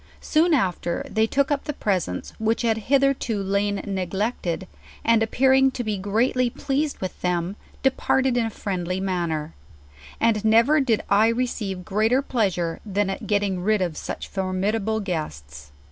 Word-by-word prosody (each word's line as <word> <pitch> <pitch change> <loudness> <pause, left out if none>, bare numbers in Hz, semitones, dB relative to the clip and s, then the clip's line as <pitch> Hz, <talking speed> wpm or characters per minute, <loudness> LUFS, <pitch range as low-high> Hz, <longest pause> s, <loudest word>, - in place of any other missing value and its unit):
Soon 325 +1 +3
after 180 -7 -1
they 220 0 +1
took 275 +4 +1
up 280 -1 0
the 295 - -2
presents, 185 - -2
which 225 +2 0
had 225 -1 +2
hitherto 275 -5 +2
lain 200 +1 0
neglected, 190 -1 -2 0.4
and 230 -1 +4
appear 260 +4 +3
ing 265 0 +5
to 255 -2 -4
be 215 -2 -1
greatly 240 +5 +1
pleased 280 +4 -2
with 185 - -6
them, 180 +1 -1 0.3
departed 265 -1 +2
in 235 -2 +1
a - - -3
friendlj 185 -3 -3
manner. 170 -5 -2 0.7
And 225 -2 +2
nerer 235 +7 +4
did 230 -5 +1
I 210 +2 +4
receive 225 -6 -2
greater 220 +8 +2
pleasure 185 -10 -1
than 205 -1 -1
at - - -6
getting 205 -3 0
rid 215 +3 +2
of 170 -3 -3
such - - -5
formidable 200 +3 -1
guests. 75 - -5
210 Hz, 155 wpm, -24 LUFS, 185-245 Hz, 0.7 s, ing